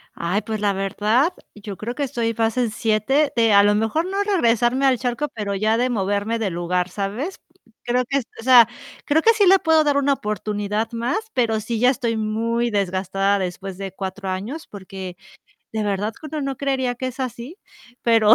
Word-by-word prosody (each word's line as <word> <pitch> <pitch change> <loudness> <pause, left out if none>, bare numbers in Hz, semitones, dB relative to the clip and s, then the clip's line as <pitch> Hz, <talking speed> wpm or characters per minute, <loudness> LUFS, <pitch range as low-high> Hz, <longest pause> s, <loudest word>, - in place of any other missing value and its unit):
Ay, 180 +5 -1
pues 220 0 -4
la 205 -1 +1
verdad, 210 - +1 0.2
yo 205 -2 -8
creo 235 +3 -5
que 290 - -2
estoy 235 -4 -1
fase 225 +2 0
7 230 +7 +1
de 230 -2 +4
a 200 0 +7
lo 205 0 +4
mejor, 225 +10 0
no 385 +2 -3
regresarme 255 - +2
al 260 -2 +4
charco, 245 +4 -2
pero 205 -2 -3
ya 215 +3 +1
de 250 +2 +1
moverme 205 0 -1
de 215 -3 0
lugar, 180 +1 -1
¿sabes? 210 - -4 0.4
Creo 250 +1 +1
que 275 +3 0
es 265 - -2
o - - -8
sea, 245 -3 +8 0.4
creo 305 +2 +3
que 455 +6 +5
sí 425 -2 +3
le 385 +1 +7
puedo 320 -1 +4
dar 290 -2 +2
una 280 0 +3
oportunidad 210 -1 -2
más, 235 +2 -1 0.2
pero 225 -3 +1
sí, 225 +1 -3
ya 250 +2 +5
estoy 235 -3 -1
muy 230 +2 0
desgastada 195 0 0
después 185 +1 -5
de 195 -1 -5
4 190 0 -5
años, 215 +13 -5
porque, 190 -2 -8 0.6
de 220 -1 -1
verdad 205 +1 -1
que 315 - -9
uno 305 0 -4
no 275 -1 -3
creería 265 -2 -1
que 260 +2 -4
es 255 +1 -8
así, 255 - -5 0.4
pero 225 -2 +6
225 Hz, 195 wpm, -22 LUFS, 205-260 Hz, 0.6 s, sea